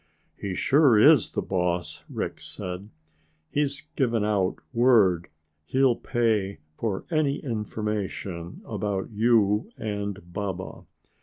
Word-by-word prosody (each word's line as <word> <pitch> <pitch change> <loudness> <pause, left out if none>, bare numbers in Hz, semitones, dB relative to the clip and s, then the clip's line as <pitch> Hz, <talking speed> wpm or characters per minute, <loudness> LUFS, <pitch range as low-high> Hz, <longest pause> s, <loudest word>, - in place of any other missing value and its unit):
"He 95 -2 -4
sure 135 - +5
is 140 +3 +6
the - - -2
boss," 90 -3 -1
Rick - - -4
said. 90 +3 -6 0.6
"He's 145 -1 0
given 115 -6 +1
out 100 -3 +1 0.2
word 110 -8 +4 0.4
he'll 130 +5 +3
pay 110 -7 0 0.2
for 100 -1 -2
any 155 -3 +2
information 105 - -4
about 100 -1 -3
you 110 - +3
and 100 -4 -4
Baba. 95 -2 -5
105 Hz, 105 wpm, -26 LUFS, 95-120 Hz, 0.6 s, is